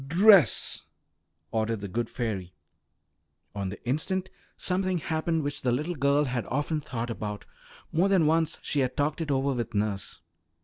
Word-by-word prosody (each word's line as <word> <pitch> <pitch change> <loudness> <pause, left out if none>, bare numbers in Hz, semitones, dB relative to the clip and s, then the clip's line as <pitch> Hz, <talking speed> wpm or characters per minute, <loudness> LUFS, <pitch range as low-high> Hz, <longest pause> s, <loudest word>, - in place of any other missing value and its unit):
"Dress!" 190 +2 +5 0.7
ordered 110 -1 -1
the 100 - -4
good 115 +4 -2
fairy. 100 -7 -4 1.0
On 100 -2 -3
the 105 +5 -10
instant 185 +8 -1 0.3
something 185 0 0
happened 160 0 -1
which 145 0 -3
the 125 - +1
little 150 +8 -1
girl 140 -1 +2
had 125 -4 -2
often 150 +3 -1
thought 120 -3 -4
about; 105 -2 -5 0.5
more 180 +5 +2
than 190 -5 +4
once 160 +1 +2
she 145 - -1
had 130 -2 0
talked 145 +3 0
it 160 - -3
over 135 0 +1
with 120 -4 -4
nurse. 100 -1 -2
140 Hz, 160 wpm, -28 LUFS, 115-160 Hz, 1.0 s, Dress